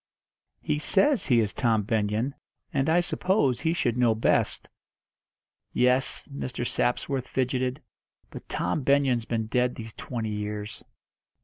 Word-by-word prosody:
"He 150 -1 0
says 210 - +3
he 120 -4 +4
is 105 -2 -1
Tom 110 -3 +1
Benyon, 110 +4 0 0.4
and 140 +1 +1
I 170 +2 +4
suppose 175 - +1
he 160 - 0
should 125 -8 0
know 115 -3 +4
best." 110 - +1 1.1
"Yes." 125 +1 +2
Mr. 125 -3 -4
Sapsworth 130 +1 -1
fidgeted. 130 +1 -1 0.5
"But - - -10
Tom 90 - -1
Benyon's 135 -4 +2
been 115 -1 -1
dead 125 +2 0
these 110 -1 -8
twenty 115 -4 -4
years." 105 +1 -5
125 Hz, 130 wpm, -27 LUFS, 110-140 Hz, 1.1 s, he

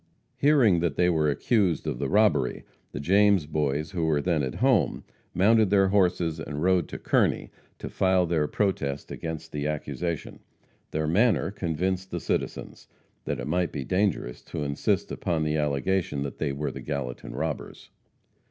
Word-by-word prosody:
Hearing 125 - +4
that 85 -4 -1
they 90 +2 +3
were 75 -2 +2
accused 95 - +1
of 75 -6 -3
the 70 - -1
robbery, 105 - +2 0.3
the - - -5
James 100 +2 +4
Boys, 75 +1 -1
who 90 -4 -2
were 80 -2 +2
then 80 0 +1
at 65 -3 -3
home, 125 -5 +2 0.3
mounted 110 +3 +4
their 95 -1 +4
horses 90 -5 +1
and 75 0 -4
rode 90 -2 +3
to - - -6
Kearney - - +1 0.3
to - - -7
file 95 -1 +2
their 80 -3 +1
protest 75 -10 -2
against 80 0 -6
the 75 0 -2
accusation. 75 +2 -4 0.5
Their 80 0 -2
manner 95 - +2
convinced 95 +1 -2
the 85 - -3
citizens - - -4 0.4
that - - -2
it - - -4
might 90 +3 0
be 70 - -4
dangerous 90 -8 -1
to 75 - -4
insist 70 -1 -1
upon 80 -3 -1
the 75 0 0
allegation 75 +1 0
that 70 - -6
they 75 -3 0
were 70 +2 -3
the - - -8
Gallatin 70 -5 -5
robbers. 80 -1 -5
85 Hz, 165 wpm, -26 LUFS, 75-95 Hz, 0.5 s, Hearing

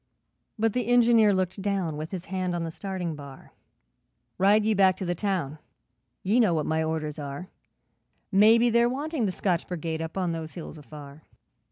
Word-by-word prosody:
But 225 -1 +1
the 245 -3 -1
Engineer 235 -3 +5
looked 185 0 -1
down, 190 -6 -1
With 155 +2 -5
his 185 -2 -6
hand 185 -1 -2
on 170 - -2
the 165 - -4
starting 185 -2 -4
bar, 140 -2 -12 0.9
'Ride 205 +3 +4
ye 220 - +3
back 190 -2 +4
to 190 - -4
the 175 - 0
town, 175 -6 -2 0.6
Ye 210 +6 +2
know 205 -8 +3
what 155 - -1
my 160 0 0
orders 160 -1 -3
are, 145 +6 -6 0.8
Maybe 225 +4 +5
they're 235 +1 +4
wanting 280 -2 -2
the - - -1
Scotch 180 -2 -1
Brigade 160 -2 -4
Up 160 +3 -6
on 180 -3 0
those 160 -1 -6
hills 165 -2 -8
afar. 145 +1 -12
185 Hz, 180 wpm, -26 LUFS, 160-210 Hz, 0.9 s, Engineer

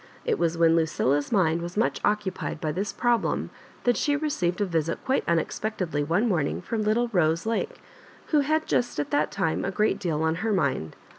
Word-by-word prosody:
It - - 0
was 170 0 +1
when 165 -1 +5
Lucilla's 145 -3 +1
mind 170 -6 +2
was 175 +3 -6
much 225 - +1
occupied 205 -6 -1
by 155 - -1
this 195 +6 -2
problem 240 -2 0 0.3
that 245 -1 +3
she 290 -1 +1
received 240 - -1
a 205 - +2
visit 165 -3 -1
quite 265 +1 +1
unexpectedly 170 -1 -1
one 170 +10 +1
morning 165 -9 0
from 225 -2 -3
little 220 +3 +1
Rose 170 -4 +1
Lake, 230 - -2 0.5
who 305 - +4
had 310 +2 +1
just 245 -10 0
at 145 - -2
that 150 +1 +2
time 160 - -1
a - - -1
great 205 0 +1
deal 160 -5 -1
on 160 0 +2
her 220 -1 0
mind. 140 - 0
185 Hz, 195 wpm, -26 LUFS, 160-225 Hz, 0.5 s, when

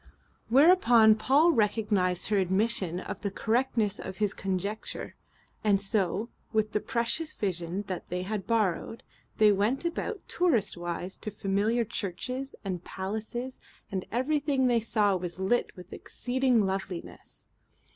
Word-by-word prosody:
Whereupon 245 -6 +6
Paul 270 +10 +4
recognized 205 - +1
her 205 -2 +3
admission 190 -1 +1
of - - -6
the 200 - -1
correctness 225 -1 0
of 190 0 -7
his 210 -1 +1
conjecture; 195 +3 -4 0.5
and 205 -2 +3
so, 200 +1 0 0.2
with 215 -1 +1
the 210 - +1
precious 265 +8 -2
vision 180 0 -2 0.2
they 180 +1 -3
had 205 0 -4
borrowed, 225 -1 0 0.3
they 215 -1 +6
went 215 - +1
about 360 +5 -3
tourist 285 - +1
wise 175 +1 -4
to - - -4
familiar 210 +4 0
churches 250 +6 -4
and 180 -3 -3
palaces, 220 +8 -5 0.3
and 190 -2 -3
everything 275 +2 +1
they 240 -2 +3
saw 210 -3 +2
was 180 -1 -4
lit 190 +6 0
with 180 +1 -11
exceeding 250 -3 0
loveliness. 190 -2 -6
215 Hz, 130 wpm, -29 LUFS, 190-240 Hz, 0.5 s, Whereupon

